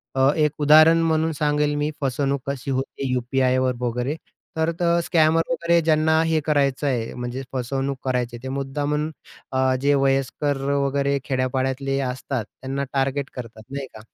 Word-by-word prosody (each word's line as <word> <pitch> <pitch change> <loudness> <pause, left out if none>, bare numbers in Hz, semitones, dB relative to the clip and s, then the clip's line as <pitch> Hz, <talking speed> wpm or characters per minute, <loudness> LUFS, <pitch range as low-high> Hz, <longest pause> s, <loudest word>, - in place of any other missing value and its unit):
अ, 135 0 +4
एक 150 -2 +2
उदाहरण 155 +3 +7
म्हणून 160 0 +1
सांगेल 150 0 +1
मी 145 +1 -1
फसवणूक 140 +1 0
कशी 140 0 -3
होती 135 0 -3
यू-पी-आयवर 130 0 +1
वगैरे. 125 +4 -1 0.4
तर 160 +1 +1
तर 170 -1 +3
स्कॅमर 165 -1 +3
वगैरे 170 -9 +2
ज्यांना 160 0 +3
हे 160 -1 +2
करायचंय 140 -5 0
म्हणजे 125 +1 -4
फसवणूक 135 +2 -2
करायची 125 -2 -1
आहे, 120 - -10
ते 130 - -4
मुद्दामून 145 +3 -2 0.4
अ, 130 0 +2
जे 145 +1 +3
वयस्कर 135 +1 +1
वगैरे 140 0 +1
खेड्या-पाड्यातले 130 +1 -1
असतात 130 -2 -3
त्यांना 135 +1 -5
टार्गेट 135 +1 0
करतात, 115 -3 -8
नाही 140 0 -4
का? - - -10
140 Hz, 150 wpm, -23 LUFS, 130-150 Hz, 0.4 s, उदाहरण